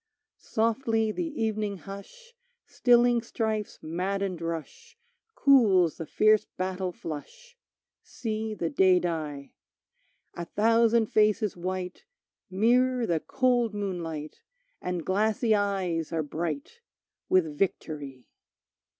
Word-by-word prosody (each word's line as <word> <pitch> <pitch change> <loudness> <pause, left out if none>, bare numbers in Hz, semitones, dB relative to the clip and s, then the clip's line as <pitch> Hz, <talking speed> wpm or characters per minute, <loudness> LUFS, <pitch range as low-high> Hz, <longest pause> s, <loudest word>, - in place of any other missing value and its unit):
Softly 225 -1 0
the 330 +9 -3
evening 210 -2 -1
hush 205 - -11 0.3
Stilling 240 -1 +4
strife's 220 -2 -3
maddened 185 +2 -2
rush 315 - -6 0.4
Cools 205 - +4
the 165 - -6
fierce 215 0 +3
battle 185 0 -2
flush, 475 - -9 0.5
See 220 -2 -4
the 170 -4 -2
day 185 -1 +5
die; 155 -5 -4 0.8
A 170 - -5
thousand 225 +3 +3
faces 215 -1 +2
white 185 - -5 0.4
Mirror 245 +5 +2
the 170 -6 +1
cold 245 +1 +1
moonlight 170 -7 -4 0.4
And 180 -2 -3
glassy 215 +3 +2
eyes 190 -6 0
are 165 -1 0
bright 155 - -4 0.5
With 160 -5 +2
Victory. 145 -7 -3
200 Hz, 100 wpm, -28 LUFS, 170-225 Hz, 0.8 s, day